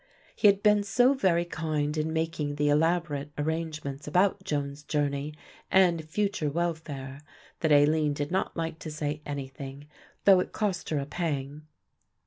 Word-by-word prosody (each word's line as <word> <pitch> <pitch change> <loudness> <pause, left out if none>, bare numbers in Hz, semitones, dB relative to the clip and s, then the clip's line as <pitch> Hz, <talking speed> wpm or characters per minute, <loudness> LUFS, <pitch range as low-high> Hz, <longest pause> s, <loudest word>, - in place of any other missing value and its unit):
He 210 - +4
had 200 0 +4
been 210 -1 +5
so 245 +6 +3
very 180 -9 +2
kind 155 -3 -2
in 155 +1 -1
making 160 -2 -2
the 145 0 +1
elaborate 150 -1 +1
arrangements 150 -2 -3
about 190 +5 +2
Joan's 145 -4 -3
journey 145 0 -2 0.3
and 175 -4 +4
future 200 -4 0
welfare 145 -4 -3 0.4
that 160 - +1
Aline 150 +1 +4
did 145 +1 -3
not 190 0 -1
like 165 -1 -3
to 160 - -6
say 150 -1 -3
anything, 140 0 -6 0.4
though 195 -2 +8
it 180 - -3
cost 195 -5 -2
her 155 - 0
a 140 - -1
pang. 150 -2 -4
155 Hz, 150 wpm, -28 LUFS, 145-175 Hz, 0.4 s, though